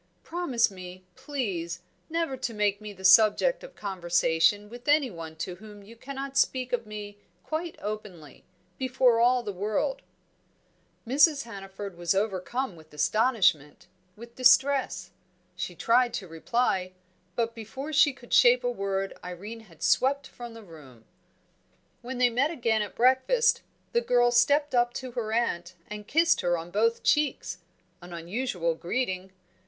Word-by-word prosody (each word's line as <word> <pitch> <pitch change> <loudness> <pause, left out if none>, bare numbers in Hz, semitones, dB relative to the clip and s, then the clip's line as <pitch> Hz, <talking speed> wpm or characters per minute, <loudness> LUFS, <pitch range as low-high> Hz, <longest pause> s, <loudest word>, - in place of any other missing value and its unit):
Promise 280 -11 0
me, 185 -1 -10
please, 185 - -4 0.3
never 330 -4 -1
to 245 -3 -4
make 205 -1 0
me 210 -1 -7
the 190 -1 -9
subject 220 - +5
of - - -12
conversation 180 +1 +1
with 240 +4 -12
anyone 210 - +1
to 175 +3 -5
whom 210 0 -13
you 225 +4 -14
cannot 275 +2 -7
speak 255 -2 +1
of 235 -3 -1
me 205 -1 -8 0.2
quite 320 +2 -4
openly, 205 -8 -7 0.4
before 255 -2 +3
all 245 +1 +3
the 205 -3 -4
world." 215 - -1 1.0
Mrs. 285 +4 +4
Hannaford 195 -4 -8
was 175 +1 +1
overcome 205 +3 -2
with 160 -1 -17
astonishment, 180 - +1 0.3
with 235 +2 -12
distress. 255 -8 +3 0.4
She 180 -1 -5
tried 240 +5 +2
to 190 - -5
reply, 185 +1 -1 0.4
but 230 -1 -1
before 265 +7 -7
she 290 0 +5
could 250 -2 -11
shape 245 +1 +6
a 245 - 0
word 195 -3 -2
Irene 195 +6 -7
had 165 - -13
swept 275 +1 +2
from 240 -3 -10
the 225 - -11
room. 140 - -15 1.0
When 250 +1 -6
they 250 -1 +3
met 260 +6 +2
again 230 -9 0
at 210 - -5
breakfast, 260 - +3 0.3
the 475 - +3
girl 245 - +3
stepped 285 +5 +3
up 240 -1 +2
to 255 -1 -5
her 235 -3 -4
aunt 185 -6 -1
and 210 0 -8
kissed 330 +3 +3
her 175 -1 +1
on 165 +1 -8
both 230 +4 +1
cheeks 290 -11 +1 0.4
an 175 0 -11
unusual 170 0 -2
greeting. 185 +1 -3
225 Hz, 150 wpm, -27 LUFS, 185-255 Hz, 1.0 s, shape